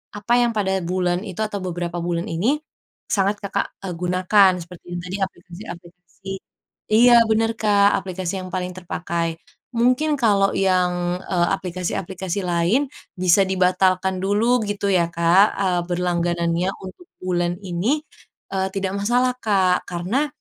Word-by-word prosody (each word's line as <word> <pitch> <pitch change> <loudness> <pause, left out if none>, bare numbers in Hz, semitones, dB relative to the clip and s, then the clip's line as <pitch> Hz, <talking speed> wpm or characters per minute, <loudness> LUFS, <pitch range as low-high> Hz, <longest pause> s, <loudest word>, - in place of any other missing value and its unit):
apa 210 +3 -1
yang 240 -1 +2
pada 190 -2 +1
bulan 180 0 0
itu 195 0 -6
atau 210 -1 -2
beberapa 175 -1 -3
bulan 170 0 -1
ini, 225 - +1 0.5
sangat 200 0 +1
Kakak, 200 - -2
eee, 185 - -4
gunakan 185 +2 +4
seperti 170 +1 -12
yang - - -3
tadi 180 +1 -5
aplikasi-aplikasi 180 0 -9 0.6
iya 240 +2 +7 0.2
benar 225 +1 +2
Kak, 205 -2 +3
aplikasi 185 0 -4
yang 185 - -8
paling 180 0 -3
terpakai. 170 -2 -3 0.4
Mungkin 255 +6 +2
kalau 200 -5 +3
yang, 180 -2 +1
eee, 175 -2 +1
aplikasi-aplikasi 185 0 -4
lain 175 +11 +1 0.3
bisa 185 +2 +5
dibatalkan 185 0 +2
dulu, 225 +5 +2
gitu 205 0 -2
ya 175 -3 +3
Kak, 170 +4 +5
eee, 185 -3 +1
berlangganannya 175 0 0 0.2
untuk 190 - -11 0.2
bulan 175 -1 0
ini, 200 - -1 0.5
eee, 190 0 0
tidak 195 -1 -2
masalah 245 +4 +2
Kak. 190 -5 +1
Karena, 185 +12 -1
185 Hz, 135 wpm, -22 LUFS, 175-205 Hz, 0.6 s, iya